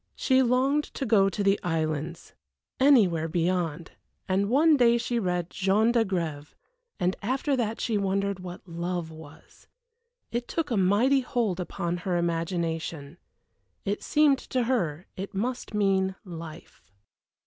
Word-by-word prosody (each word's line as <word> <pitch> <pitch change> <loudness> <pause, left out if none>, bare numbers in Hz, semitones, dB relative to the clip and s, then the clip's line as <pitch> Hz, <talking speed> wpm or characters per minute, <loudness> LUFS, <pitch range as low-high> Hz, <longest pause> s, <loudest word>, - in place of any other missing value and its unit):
She 260 -1 +3
longed 265 +4 +2
to 270 - -2
go 200 -4 +4
to 200 +2 -3
the 195 0 +3
islands 160 0 -3 0.5
anywhere 205 - +4
beyond 170 -1 -1 0.4
and 195 +2 +1
one 305 +5 +5
day 235 -3 +4
she 235 0 -1
read 180 -4 -2
Jean 200 +4 +2
d'Agrève; 175 -10 -1 0.4
and 180 0 +1
after 265 +6 0
that 225 -3 -2
she 220 -4 0
wondered 200 0 -1
what 180 +1 -9
Love 170 -1 -4
was. 160 -2 -15 0.6
It 240 +1 -3
took 325 -5 -2
a - - +2
mighty 210 +8 +3
hold 235 -8 -1
upon 175 -1 -3
her 175 0 -1
imagination. 165 -2 -2 0.7
It 200 +1 -2
seemed 295 -3 +3
to 255 -1 -2
her 185 - -1
it 195 +1 -6
must 240 +2 -3
mean 190 -2 +1
Life. 165 -2 -10
195 Hz, 135 wpm, -27 LUFS, 170-235 Hz, 0.7 s, one